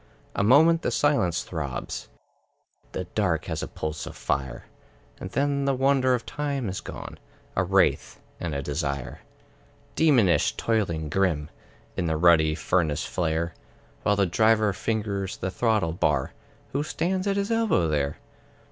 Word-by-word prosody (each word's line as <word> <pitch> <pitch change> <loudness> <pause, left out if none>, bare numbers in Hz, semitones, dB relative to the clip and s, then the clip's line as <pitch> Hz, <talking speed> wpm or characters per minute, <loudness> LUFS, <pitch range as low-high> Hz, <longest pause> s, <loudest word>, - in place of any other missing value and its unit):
A - - +1
moment 160 +9 +6
the - - 0
silence 135 - +1
throbs, 70 -7 -5 0.8
The - - -2
dark 90 -7 0
has 80 -2 -3
a - - -3
pulse 75 0 -5
of - - -8
fire; 65 -2 -2 0.5
And 95 - -6
then 140 +4 0
the 135 -1 +2
wonder 130 -1 +3
of 120 - -5
time 140 -6 -2
is 95 - -4
gone, - - -8 0.4
A - - +2
wraith - - +2 0.2
and 80 -4 -3
a 70 - -2
desire. 70 -3 -3 0.8
Demonish, 125 - +4
toiling, 90 -9 0
grim, 80 -3 0 0.4
In 90 - -1
the 80 -1 0
ruddy 80 -2 +5
furnace 80 -4 0
flare, 85 -1 -1 0.5
While 105 - +2
the 100 -1 +3
Driver 110 +2 +3
fingers 100 -4 -2
the 95 - -3
throttle 105 -7 +1
bar, 75 -6 0 0.4
Who 140 - 0
stands 185 +5 -1
at 200 0 +1
his 200 +2 -1
elbow 225 - +2
there? 75 -2 -1
95 Hz, 145 wpm, -26 LUFS, 80-130 Hz, 0.8 s, moment